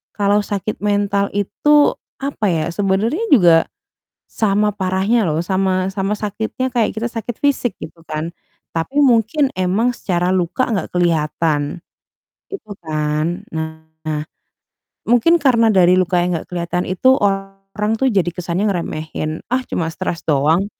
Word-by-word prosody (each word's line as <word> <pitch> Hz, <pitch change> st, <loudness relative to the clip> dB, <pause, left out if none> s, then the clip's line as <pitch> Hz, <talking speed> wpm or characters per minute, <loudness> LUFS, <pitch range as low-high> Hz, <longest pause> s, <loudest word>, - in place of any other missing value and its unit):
kalau 205 Hz, 0 st, +2 dB
sakit 205 Hz, +1 st, -3 dB
mental 200 Hz, -1 st, +1 dB
itu, 290 Hz, +9 st, +3 dB, 0.3 s
apa 275 Hz, -6 st, -2 dB
ya, 160 Hz, -2 st, 0 dB
sebenernya 205 Hz, -, 0 dB
juga, 175 Hz, -9 st, +7 dB, 0.8 s
sama 210 Hz, -1 st, +1 dB
parahnya 190 Hz, +2 st, +1 dB
loh 155 Hz, +1 st, 0 dB
sama-sama 190 Hz, +2 st, 0 dB
sakitnya 220 Hz, +5 st, -3 dB
kayak 230 Hz, -3 st, +1 dB
kita 230 Hz, +2 st, -2 dB
sakit 230 Hz, 0 st, -5 dB
fisik, 265 Hz, -7 st, +1 dB
gitu 160 Hz, +1 st, -9 dB
kan. 155 Hz, +2 st, -4 dB, 0.4 s
Tapi 265 Hz, -, -1 dB
mungkin 255 Hz, +3 st, +3 dB
emang 190 Hz, +7 st, +1 dB
secara 180 Hz, -1 st, -1 dB
luka 180 Hz, +7 st, 0 dB
nggak 195 Hz, -6 st, -2 dB
kelihatan. 160 Hz, -2 st, 0 dB, 0.7 s
Gitu 390 Hz, -, -8 dB
kan. 155 Hz, +3 st, -2 dB
Nah, 160 Hz, -1 st, -5 dB, 0.9 s
mungkin 245 Hz, +9 st, +4 dB
karena 235 Hz, -5 st, +4 dB
dari 180 Hz, -1 st, +5 dB
luka 180 Hz, -1 st, +2 dB
yang 180 Hz, 0 st, 0 dB
nggak -, -, -11 dB
kelihatan 175 Hz, 0 st, -2 dB
itu 260 Hz, +8 st, +4 dB
orang 195 Hz, +1 st, -2 dB
tuh 265 Hz, -1 st, +3 dB
jadi 190 Hz, -5 st, +1 dB
kesannya 180 Hz, +3 st, -2 dB
ngeremehin, 155 Hz, -3 st, -4 dB
"Ah, 255 Hz, +1 st, +1 dB
cuma 165 Hz, -, -1 dB
stres 180 Hz, -3 st, -4 dB
doang, 155 Hz, +6 st, +2 dB
195 Hz, 135 wpm, -19 LUFS, 170-220 Hz, 0.9 s, juga